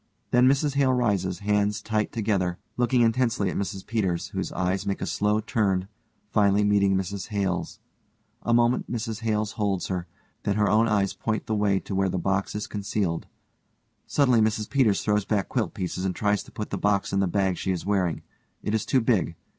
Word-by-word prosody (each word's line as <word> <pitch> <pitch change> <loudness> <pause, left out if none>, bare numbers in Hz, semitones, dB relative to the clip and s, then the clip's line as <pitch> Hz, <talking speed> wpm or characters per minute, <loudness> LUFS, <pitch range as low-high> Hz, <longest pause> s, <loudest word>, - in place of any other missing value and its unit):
Then_ 125 +1 +6
MRS 140 +2 +2
HALE 135 -2 +3
rises, 100 -7 0
hands 105 0 +1
tight 110 -1 -1
together, 100 -6 0 0.2
looking 125 0 +2
intensely 115 -4 +2
at - - -6
MRS 95 0 -3
PETERS, 95 -7 -1
whose - - -3
eyes 90 +1 -1
make 100 - -1
a - - -2
slow 105 +1 +1
turn, 95 -4 0 0.4
finally 100 -1 +3
meeting 100 -1 +3
MRS 95 +1 -3
HALE_'s. 95 -4 -2 0.6
A 120 - -1
moment_ 120 +1 +3
MRS 115 -2 -3
HALE 110 -2 0
holds 100 -3 -2
her, 90 -2 -3 0.3
then 100 - 0
her 105 -1 +2
own 110 +2 +4
eyes 100 -3 +1
point 110 -1 -2
the 110 - -2
way 105 -2 +2
to - - -7
where 95 0 +1
the 95 - -2
box 95 +3 -1
is 105 - -2
concealed. 100 -4 -2 0.8
Suddenly 125 -5 +3
MRS 110 -1 0
PETERS 125 -8 +2
_throws 105 -1 +1
back 100 -4 0
quilt - - -1
pieces 90 0 -3
and 95 -2 -1
tries 105 -1 +1
to - - -14
put 105 - -6
the - - -2
box 100 -1 +1
in 100 - +2
the 95 - +2
bag 95 0 0
she - - -3
is 90 -2 -3
wearing. 95 -5 0 0.4
It 105 - -2
is 110 - 0
too 130 - +3
big. 110 -8 +1
105 Hz, 195 wpm, -26 LUFS, 95-110 Hz, 0.8 s, Then